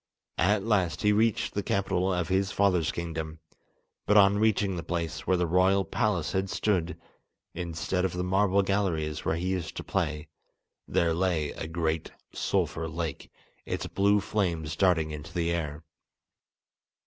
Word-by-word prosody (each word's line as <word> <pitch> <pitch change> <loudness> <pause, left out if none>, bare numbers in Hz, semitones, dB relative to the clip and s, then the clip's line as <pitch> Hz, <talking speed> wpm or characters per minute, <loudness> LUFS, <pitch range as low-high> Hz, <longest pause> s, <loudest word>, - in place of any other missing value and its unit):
At 100 +3 +3
last 100 -6 +1
he 105 - +5
reached 110 +1 +1
the 100 - -1
capital 95 -1 0
of 90 -2 -1
his 95 +1 +1
father's 90 -5 +2
kingdom, 80 -2 -5 0.7
but 105 - +5
on 100 0 +6
reaching 105 -3 +2
the 85 - -3
place 85 -1 -4
where 95 - +3
the 90 - +1
royal 95 +3 +3
palace - - 0
had 95 0 -1
stood, 90 -7 0 0.6
instead 85 +2 -2
of 95 - 0
the 90 0 -2
marble 100 +1 +2
galleries 85 -6 -1
where 80 - +1
he 90 +3 -2
used 90 -4 -3
to - - -4
play, 80 -6 -2 0.6
there 85 -1 +2
lay 85 -4 0
a 80 - -6
great 80 -1 -1 0.2
sulphur 80 0 -1
lake, 85 0 -4 0.3
its - - -3
blue 100 +1 +2
flames 85 -7 -1
darting 85 -5 +2
into 75 -1 -7
the 85 -1 0
air. 80 -2 -3
90 Hz, 155 wpm, -28 LUFS, 80-100 Hz, 0.7 s, on